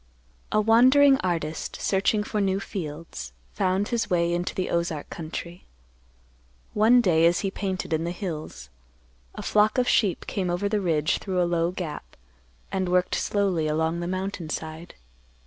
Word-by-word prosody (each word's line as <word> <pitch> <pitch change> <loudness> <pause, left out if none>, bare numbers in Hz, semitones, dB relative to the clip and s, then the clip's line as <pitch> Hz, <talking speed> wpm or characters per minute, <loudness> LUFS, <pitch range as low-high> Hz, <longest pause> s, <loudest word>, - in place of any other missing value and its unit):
A - - +3
wandering 260 +6 +6
artist, 165 -4 -3
searching 205 +2 +1
for 210 0 -2
new 195 -1 +1
fields, 155 - -6 0.2
found 190 +2 0
his 235 -2 -1
way 170 -1 +1
into 175 +1 -2
the 185 - -2
Ozark 170 -3 -2
country. 170 +2 -7 1.1
One 230 +4 +5
day, 165 -6 +4
as 170 0 +2
he 195 -2 -2
painted 190 -4 -3
in 160 +1 0
the 170 - -2
hills, 155 - -6 0.7
a - - -6
flock 210 +2 +3
of 250 0 +2
sheep 200 -6 +2
came 190 -3 -2
over 175 +3 0
the 205 0 0
ridge 160 -4 +1
through 185 -2 -2
a 175 - +3
low 170 -1 +1
gap, 175 -5 -7 0.5
and 185 -1 -1
worked 180 0 +2
slowly 190 -6 0
along 160 +2 0
the 175 - -3
mountain 185 -2 -4
side. 160 +2 -6
180 Hz, 160 wpm, -25 LUFS, 165-200 Hz, 1.1 s, wandering